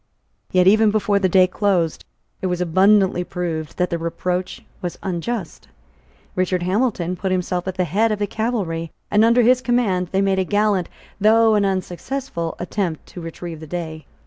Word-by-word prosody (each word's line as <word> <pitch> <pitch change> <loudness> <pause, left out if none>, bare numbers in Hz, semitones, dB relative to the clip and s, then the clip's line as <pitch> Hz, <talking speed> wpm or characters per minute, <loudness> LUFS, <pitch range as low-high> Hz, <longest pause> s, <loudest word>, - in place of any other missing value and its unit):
Yet, 180 -1 +4
even 215 +3 +5
before 205 -1 +1
the 190 -2 +2
day 185 +1 +6
closed, 185 -3 0 0.4
it 190 - -1
was 180 -1 -1
abundantly 190 +1 +3
proved 165 -4 -4
that 180 -1 0
the 170 - -1
reproach 180 +2 -3 0.2
was 175 -1 -4
unjust. 190 +1 -4 0.7
Richard 185 -1 0
Hamilton 185 -2 0
put 190 +1 -3
himself 180 0 -1
at 190 - -3
the 185 - +1
head 205 +7 +1
of 215 - 0
the 205 - 0
cavalry, 195 -7 -2 0.2
and, 210 +1 +4
under 235 +2 +5
his 250 +2 +4
command, 220 -8 +1
they 195 - +1
made 195 -1 +1
a - - +2
gallant, 205 -1 +1 0.3
though 220 +2 +5
an 205 -1 +3
unsuccessful 185 0 -3
attempt 175 -3 -3
to 175 - -9
retrieve 165 0 -7
the 160 - -10
day. 160 -2 -6
185 Hz, 170 wpm, -21 LUFS, 175-210 Hz, 0.7 s, day